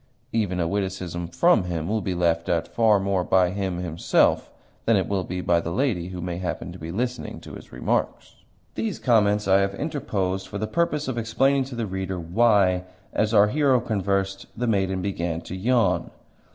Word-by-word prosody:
Even 100 -5 0
a 85 - +1
witticism 95 -3 -3
from 110 - +3
him 85 -3 -3
will 110 +1 0
be 95 -3 -2
laughed 85 -1 +1
at 85 -1 +1
far 110 -3 +3
more 95 -1 0
by 90 -1 +3
him 95 -2 -2
himself 85 -2 +1 0.4
than 115 -2 +4
it 95 - 0
will 100 -2 -1
by 90 -1 0
the 85 - -4
lady 95 -3 0
who 90 -1 -7
may 90 0 -4
happen 90 -1 -4
to 90 - -10
be 80 - -7
listening 125 +6 -3
to - - -11
his - - -11
remarks. - - -2 0.4
These 220 -4 -2
comments 105 -4 +2
I 95 0 +5
have 100 0 0
interposed 100 - -2
for 100 - -6
the 110 - -2
purpose 150 +1 0
of 125 -3 -2
explaining 135 +4 +2
to 130 -1 -8
the 115 -1 -2
reader 95 -1 -4
why, 90 0 +3 0.3
as 105 0 +1
our 105 -2 +5
hero 135 -1 +3
conversed, 100 -3 -1
the 120 - -1
maiden 95 -4 0
began 85 -4 -2
to 90 - -7
yawn. 95 -5 +1
95 Hz, 190 wpm, -24 LUFS, 90-115 Hz, 0.4 s, I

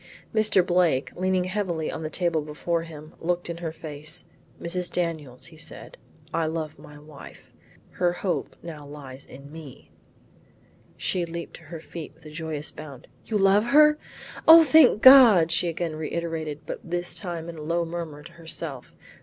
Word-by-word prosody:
Mr. 215 -4 +4
Blake 175 -7 +1
leaning 185 0 0
heavily 185 -4 -2
on - - -6
the 155 - -4
table 170 -1 0
before 155 +3 -2
him, 155 -2 -11
looked 175 0 -2
in 170 - -6
her 170 -2 -4
face. 155 0 -5 0.3
"Mrs. 180 +1 -1
Daniels," 160 -5 -4
said - - -6 0.3
he, - - -26
"I 160 - 0
love 155 -1 -4
my 150 - -13
wife; 150 -1 -14 0.4
her 175 -1 +1
hope 180 +1 -3
now 160 -3 -8
lies 140 -2 -11
in 140 +2 -13
me." 155 -4 -12 1.1
She 180 - -1
leaped 170 0 -6
to - - -18
her 165 +2 -8
feet 160 0 -9
with - - -24
a 155 - -10
joyous 155 -2 -4
bound. 145 -5 -11 0.2
"You 220 - 0
love 200 +2 +4
her? 300 +4 +5 0.5
O 325 +1 +10
thank 300 -8 +5
God!" 235 -11 +8
she 170 +1 +2
again 165 -1 -3
reiterated 160 -1 -4
but - - -5
this 175 +1 -2
time 170 -4 -4
in 165 -2 -8
a - - -7
low 170 +2 -1
murmur 165 -3 -6
to 170 - -12
her 170 -1 -15
self. 150 -6 -4
165 Hz, 170 wpm, -25 LUFS, 155-180 Hz, 1.1 s, O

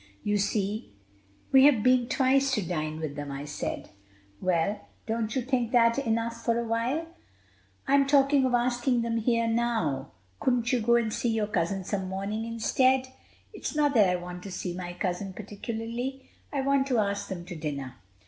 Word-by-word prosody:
"You 205 0 +1
see, 200 - -2 0.6
we 265 0 +7
have 255 -8 +5
been 255 -1 +4
twice 270 +1 +3
to 210 - -1
dine 155 -3 -2
with 155 -3 -4
them," 145 -1 -5
I 140 +1 -5
said. 150 - -5 0.5
"Well, 185 +3 0 0.2
don't 225 -1 -2
you 260 - 0
think 245 -2 0
that 230 +1 +4
enough 230 -2 -1
for 230 -1 +1
a 235 - 0
while?" 240 +8 0 0.8
"I'm 275 0 +4
talking 275 -1 +4
of 250 -1 +2
asking 245 0 +1
them 230 0 -1
here 230 +1 +1
now." 225 - 0 0.3
"Couldn't 245 0 +1
you 245 - +2
go 235 +2 +4
and 230 -2 +1
see 240 - 0
your 225 -2 +1
cousin 190 -1 -1
some 190 0 -3
morning 200 +4 -3
instead?" 255 +3 +2 0.4
"It's - - -5
not 295 -1 +3
that 210 -6 +5
I 180 - +2
want 180 0 -6
to 195 - -8
see 180 -1 -4
my 175 -1 -5
cousin 185 +2 -3
particularly. 230 +6 -5 0.2
I 280 - -1
want 275 0 +2
to 255 -3 +1
ask 200 -2 0
them 175 -3 -6
to 180 -1 -7
dinner." 140 -4 -5
225 Hz, 180 wpm, -28 LUFS, 190-250 Hz, 0.8 s, we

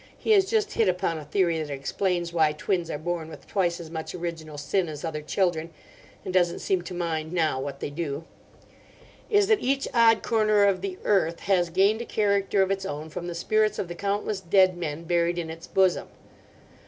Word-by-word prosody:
He - - -1
has 395 -3 +6
just 430 0 0
hit 225 -4 +3
upon 170 -3 -1
a - - -8
theory 170 +1 +1
that 150 - -5
explains 170 +5 -2
why 160 -3 +3
twins 170 +2 -1
are 150 - -2
born 165 0 -3
with - - -11
twice 175 -4 0
as 165 -2 -9
much 160 +1 -5
original 165 -3 -5
sin 175 +4 0
as 150 +1 -6
other 155 -2 -3
children, 165 0 0 0.6
and 185 - -4
doesn't 175 -2 +2
seem 190 -2 0
to 180 +1 -7
mind 160 -2 -2
now 160 -6 +1
what 140 0 -6
they - - -3
do) 150 -1 -4 1.1
is 410 -2 +4
that 430 +1 +3
each 275 +1 0
odd 230 -2 +5
corner 215 -2 +3
of 195 -2 +3
the 190 -1 -4
earth 170 -5 +1
has 180 -3 +2
gained 200 +6 +3
a - - -5
character 200 -2 +2
of 190 - -1
its 195 0 -1
own 150 +2 -5
from 175 +2 -5
the 175 - -5
spirits 215 +4 +1
of 180 - -3
the - - -4
countless 200 +2 -2
dead 185 +1 +4
men 165 -2 -4
buried 170 0 +1
in 165 -2 -3
its 165 +1 -10
bosom. 190 -2 +2
175 Hz, 205 wpm, -26 LUFS, 160-200 Hz, 1.1 s, has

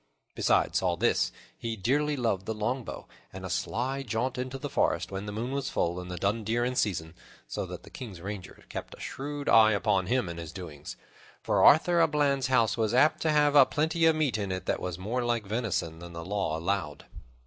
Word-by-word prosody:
Besides - - +2
all 90 -2 +1
this, - - +2 0.2
he 115 -1 -4
dearly 145 +8 +1
loved 100 -7 -1
the 110 - -2
longbow, 115 +4 -3 0.2
and - - -8
a - - -5
sly 130 +5 -1
jaunt 125 +1 -2
in 130 +1 -2
the 135 0 -5
forest - - 0
when 95 +2 -5
the - - -3
moon 115 +5 -3
was 140 0 -2
full 85 +1 -1
and 90 0 -7
the 90 - -5
dun 105 +5 0
deer 115 +3 0
in 125 +1 -2
season; 80 -8 -1 0.3
so - - -4
that - - -8
the - - -14
King's 105 -9 -8
rangers 95 +1 -7
kept - - -7
a - - -20
shrewd 145 +1 -5
eye 110 -1 +7
upon 100 -2 +1
him 125 -4 +1
and 85 0 -6
his 85 -2 -7
doings, 85 -7 -8 0.5
for - - +2
Arthur 170 +3 +6
a 165 - +5
Bland's 140 -3 +1
house 115 -6 +3
was 110 0 +1
apt 150 +5 +4
to 160 - +1
have 150 -1 +4
aplenty 160 +4 +4
of 160 - +4
meat 145 -8 0
in 100 -2 -2
it 95 0 -4
that - - 0
was 90 -2 -4
more 115 +7 -2
like 120 -2 0
venison 100 -7 -2
than 85 0 -10
the 85 0 -7
law 95 -5 -1
allowed. 85 -3 -2
110 Hz, 215 wpm, -29 LUFS, 95-130 Hz, 0.5 s, eye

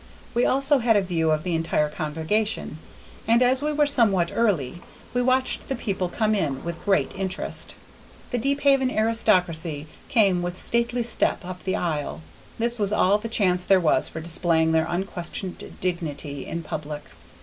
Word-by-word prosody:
We 240 0 +2
also 275 +1 +3
had 230 -2 +3
a 205 - +4
view 165 -3 0
of 155 0 +1
the 180 - -2
entire 160 -2 +1
congregation, 160 +4 -2 0.5
and 235 +2 +4
as 255 +2 +2
we 300 +1 0
were 295 0 +2
somewhat 205 -11 +3
early, 175 - 0 0.3
we 245 - +1
watched 255 +1 +1
the 270 - -2
people 190 -6 -2
come 215 +3 0
in, 145 -10 -1
with 170 0 -6
great 195 -2 +1
interest. 190 0 -3 0.6
The 245 - 0
Deephaven 275 0 +2
aristocracy 180 - +1 0.2
came 195 -7 +3
with 175 +1 -4
stately 235 +1 0
step 225 -4 +1
up 180 0 -8
the 190 - 0
aisle; 150 - -3 0.4
this 235 +1 -1
was 205 -1 +1
all 205 0 +3
the 230 - -6
chance 180 -5 +2
there 190 0 +4
was 165 -4 +2
for 160 - -7
displaying 160 -1 +1
their 160 0 +2
unquestioned 180 0 -4 0.2
dignity 150 -6 -4
in 170 0 -4
public. 150 -1 -6
190 Hz, 165 wpm, -24 LUFS, 165-230 Hz, 0.6 s, a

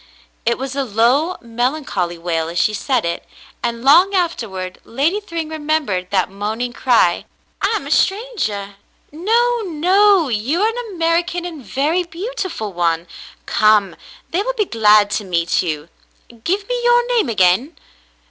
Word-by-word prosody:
It 235 - +2
was 270 +1 -5
a 280 - 0
low 255 - +2
melancholy 235 - -2
wail 165 -1 -2
as 170 - -6
she 215 - +2
said 250 +1 0
it, 170 - -3 0.4
and 235 0 -3
long 350 +9 +5
afterward 205 - -2
Lady 295 - 0
Thryng 335 -5 -5
remembered 295 -12 -1
that 190 -3 +1
moaning 220 +5 -3
cry, 230 -9 +2 0.4
"I - - +1
am - - -3
a - - -6
strangah.'* 300 - -1 0.3
"No, 465 +9 +1
no. 370 +2 +3
You 250 - 0
are 440 - +3
an 460 -2 -6
American 340 +1 0
and 325 -5 -7
a - - -17
very 295 - 0
beautiful 350 - -5
one. 170 -1 0 0.4
Come, 210 -4 +3 0.4
they 355 - +1
will - - -2
be 435 -4 0
glad 210 - +4
to 210 - -1
meet 170 -3 0
you. 155 -3 -4 0.6
Give 395 +3 -1
me - - -2
your 485 0 +4
name 440 - +2
again." 205 - +2
270 Hz, 155 wpm, -19 LUFS, -, 0.6 s, long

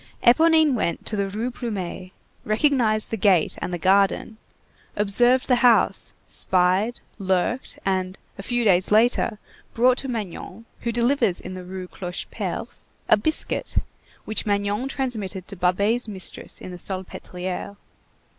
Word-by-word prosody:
Éponine 315 +4 +5
went 210 -8 -1
to 215 - -1
the 200 -1 -1
Rue 220 +5 -3
Plumet, 195 -7 -5 0.3
recognized 220 -2 +1
the 225 - -1
gate 190 -5 +3
and - - -3
the 175 - -2
garden, 195 +4 +2 0.6
observed 240 +5 +3
the 250 - +4
house, 240 -1 +4
spied, 185 +5 +1 0.2
lurked, 190 +6 -1
and, 185 -1 -1 0.2
a - - -7
few 240 +4 -1
days 185 -2 +4
later, 225 0 +3 0.4
brought 250 +2 +4
to 270 - -5
Magnon, 220 -2 -6
who 235 - -2
delivers 235 -5 +2
in 185 - -8
the 185 0 -7
Rue 185 0 -7
Clocheperce, 180 -1 -5 0.2
a - - +8
biscuit, 310 +10 0 0.5
which 215 +1 -1
Magnon 205 +4 0
transmitted 215 -9 -3
to 200 - -8
Babet's 200 +7 +1
mistress 190 -3 -3
in 185 - -8
the 180 - -7
Salpêtrière. 185 +1 -5
205 Hz, 135 wpm, -24 LUFS, 185-240 Hz, 0.6 s, a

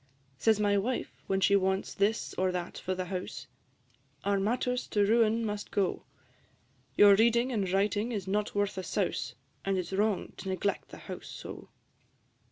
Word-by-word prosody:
Says 220 -2 +3
my 205 -1 +3
Wife, 245 +5 -2 0.2
when 190 0 +1
she 200 - +5
wants 190 0 +1
this 210 +3 0
or 185 0 +1
that 180 -1 -4
for 185 - -2
the 185 0 -3
house, 180 -7 -5 0.8
"Our 200 0 +2
matters 250 +4 0
to 205 -1 +2
ruin 225 +1 +3
must 210 -1 -4
go: 195 -3 -1 0.9
Your 205 -1 +9
reading 235 +4 +4
and 200 -6 0
writing 205 +4 +1
is 200 -5 -3
not 205 +2 -1
worth 205 -1 0
a - - -4
souse, 135 - -2 0.3
And 195 -1 0
it 180 - -1
's 180 - -9
wrong 205 0 0
to 195 - -6
neglect 190 +2 -1
the - - -10
house - - -7
so." - - -9
200 Hz, 175 wpm, -30 LUFS, 190-215 Hz, 0.9 s, Your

